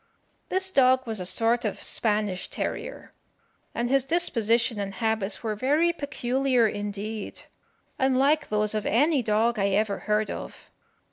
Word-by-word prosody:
This 375 0 0
dog 260 -3 +4
was 220 -3 -4
a 180 - -3
sort 230 +4 +2
of 210 - -3
Spanish 210 -4 0
terrier, - - -5 0.6
and 235 - -1
his 270 +1 +2
disposition 235 -8 +1
and 195 -1 -4
habits 220 -1 -1
were 220 -2 -1
very 295 +10 +1
peculiar 265 -5 0
indeed, 205 +1 -5 0.6
unlike 270 +3 +2
those 210 0 0
of 215 -1 -2
any 285 +5 +3
dog 220 +1 +1
I 195 - +2
ever 200 +1 0
heard 210 0 +1
of. - - -9
230 Hz, 140 wpm, -26 LUFS, 210-265 Hz, 0.6 s, dog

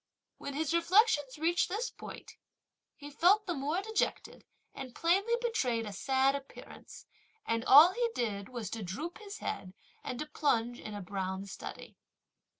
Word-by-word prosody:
When 280 - -6
his 315 +1 -1
reflections 340 - +3
reached 335 +3 +1
this 440 +6 -2
point, - - -10 0.6
he 290 0 -10
felt 370 +8 +4
the 355 - -1
more 300 +6 -2
dejected, 440 0 -2 0.3
and 255 -3 -8
plainly 390 +8 +2
betrayed 255 - 0
a 205 - -6
sad 265 +6 +2
appearance, 280 -1 -10 0.4
and 230 0 0
all 305 +7 +9
he 475 +2 0
did 200 -4 -2
was 235 -5 -5
to 225 - -4
droop 280 - -5
his 410 -1 -8
head 185 0 -5 0.3
and 250 - -4
to 305 - -3
plunge 240 -6 0
in 215 - -7
a 205 - -5
brown 190 0 -4
study. 195 - -9
280 Hz, 155 wpm, -32 LUFS, 230-360 Hz, 0.6 s, all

